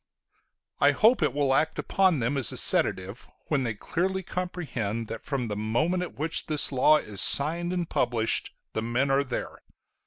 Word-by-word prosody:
I - - +4
hope 225 +4 +3
it - - +2
will 140 -2 0
act 160 +4 0
upon 190 -4 +1
them 125 +5 -1
as 130 -7 +2
a - - -5
sedative 95 +5 +2 0.2
when 145 -3 +1
they 115 -4 -3
clearly 190 - -3
comprehend 135 - -4
that 115 - -7
from 135 -5 -3
the 105 - -4
moment 120 - -1
at 180 - -7
which 160 +3 0
this 150 -2 +2
law 140 +3 +4
is 105 -8 -5
signed 170 +5 +2
and 175 -2 -2
published 115 -6 -1 0.2
the 110 - -2
men 120 +5 -1
are 135 +1 +2
there. 125 -3 -6
140 Hz, 180 wpm, -26 LUFS, 115-170 Hz, 0.2 s, I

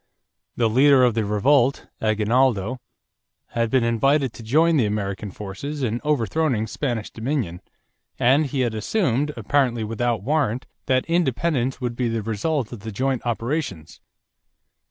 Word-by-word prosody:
The 115 - +2
leader 130 +3 +5
of 125 -2 +4
the 110 -1 0
revolt, 125 +6 +2 0.2
Aguinaldo, 110 +1 +1 0.7
had 115 -1 -1
been 130 0 +2
invited 130 +3 +2
to - - -11
join 160 +9 +3
the 120 -6 +3
American 100 -1 -3
forces 105 +10 -6
in 120 0 -1
overthrowing 145 -3 0
Spanish 115 -1 -3
dominion, 110 - -3 0.6
and 140 +5 +3
he 135 0 -2
had 120 -3 0
assumed, 140 - 0
apparently 120 0 +1
without 115 0 -1
warrant, 135 -3 0 0.2
that 130 -1 +2
independence 150 -5 0
would 120 -2 -3
be 125 0 0
the 115 -1 -2
result 115 +4 -1
of 120 - -7
the 110 +2 -7
joint 130 +3 -1
operations. 115 - -3
120 Hz, 140 wpm, -23 LUFS, 110-140 Hz, 0.7 s, leader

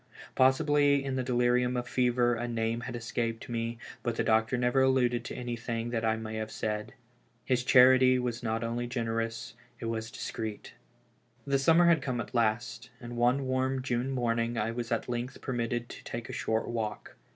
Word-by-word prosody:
Possibly 140 +1 +3
in 135 -1 -2
the 130 - 0
delirium 125 0 +1
of 120 0 -3
fever 120 -1 +2
a 120 +1 -3
name 115 0 -1
had 120 +1 -5
escaped 115 -1 -3
me; 115 0 -3 0.2
but 120 -2 -2
the - - 0
doctor 110 +2 +2
never 125 +2 +2
alluded 125 -2 +2
to - - -6
anything 120 -1 -4
I 110 -1 +1
may 110 0 -5
have 110 0 -3
said. 105 -1 -4 0.5
Ilis 125 -2 +2
charity 130 0 +6
was 120 -2 -2
not 115 0 -1
only 120 +1 -2
generous, 115 -1 -3 0.3
it - - -6
was 115 0 -3
discreet. 110 -2 -6 0.7
The 140 -1 +1
summer 165 +5 +5
had 170 -3 +4
come 130 -3 -2
at 115 - -6
last, 115 0 0
and 120 0 -8
one 125 +3 +2
warm 130 0 0
June 125 0 -1
morning 120 -2 0
I 110 +1 0
was 120 0 -5
at 115 - -1
length 120 +2 -4
permitted 120 -1 -2
to - - -10
take 120 -1 -6
a - - -5
short 110 0 -1
walk. 110 -3 -4
120 Hz, 180 wpm, -30 LUFS, 115-130 Hz, 0.7 s, charity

